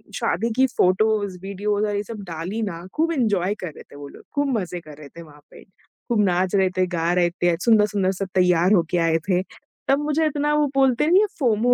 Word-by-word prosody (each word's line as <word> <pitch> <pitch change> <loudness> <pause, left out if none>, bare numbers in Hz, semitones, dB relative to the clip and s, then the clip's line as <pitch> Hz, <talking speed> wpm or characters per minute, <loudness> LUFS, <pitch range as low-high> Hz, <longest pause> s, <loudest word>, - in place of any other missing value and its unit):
शादी 230 - -1
की 265 0 +4
photos, 205 -3 +1
videos 205 +2 -2
और 205 -1 -2
ये 205 - -1
सब 210 0 -8
डाली 175 +7 -4
ना, 175 -4 -5
खूब 330 +2 0
एन्जॉय 205 - 0
कर 180 - -5
रहे - - -11
थे - - -13
वो 145 0 -9
लोग, - - -14
खूब 280 -4 +1
मज़े 180 -1 -5
कर 150 -3 -13
रहे 145 -2 -12
थे - - -8
वहाँ 150 -2 -15
पे, - - -14
खूब 210 +3 -4
नाच 185 +1 0
रहे 190 -1 +3
थे, 185 - +3
गा 170 -1 -1
रहे 175 -1 +2
थे, 175 -1 0
सुंदर-सुंदर 210 -4 +3
सब 195 - -1
तैयार 180 +1 +3
होके 175 -1 +1
आए 165 0 +2
थे, 180 0 +2 0.5
तब 275 +1 +3
मुझे 300 +2 0
इतना, 295 0 0
वो 300 -1 +2
बोलते 270 +1 +3
नहीं 370 +4 +5
है 430 - +2
फ़ोमो 245 -2 +2
200 Hz, 225 wpm, -22 LUFS, 175-240 Hz, 0.5 s, नहीं